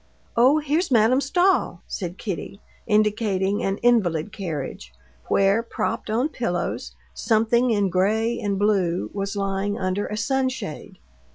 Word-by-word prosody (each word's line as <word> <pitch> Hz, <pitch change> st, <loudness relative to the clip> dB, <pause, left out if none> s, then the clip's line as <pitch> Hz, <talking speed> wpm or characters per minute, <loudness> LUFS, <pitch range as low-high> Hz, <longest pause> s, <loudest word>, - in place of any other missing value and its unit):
"Oh, 255 Hz, +6 st, +5 dB
here's 310 Hz, +4 st, 0 dB
Madame 240 Hz, +2 st, +4 dB
Stahl," 360 Hz, +7 st, +1 dB
said 180 Hz, -2 st, -5 dB
Kitty, 200 Hz, -1 st, -5 dB, 0.3 s
indicating 210 Hz, -2 st, +1 dB
an 195 Hz, 0 st, -1 dB
invalid 205 Hz, -7 st, +2 dB
carriage, 145 Hz, -, -5 dB, 0.4 s
where, 195 Hz, +3 st, +3 dB
propped 230 Hz, -, -3 dB
on 240 Hz, +7 st, +1 dB
pillows, 180 Hz, -, -3 dB, 0.2 s
something 235 Hz, +2 st, +2 dB
in 205 Hz, -4 st, +2 dB
gray 220 Hz, +6 st, +1 dB
and 200 Hz, -1 st, -1 dB
blue 190 Hz, -4 st, +1 dB
was 200 Hz, 0 st, -3 dB
lying 195 Hz, 0 st, -1 dB
under 185 Hz, +2 st, -1 dB
a 210 Hz, -, -4 dB
sunshade. 260 Hz, -, -2 dB
210 Hz, 125 wpm, -23 LUFS, 195-235 Hz, 0.4 s, Oh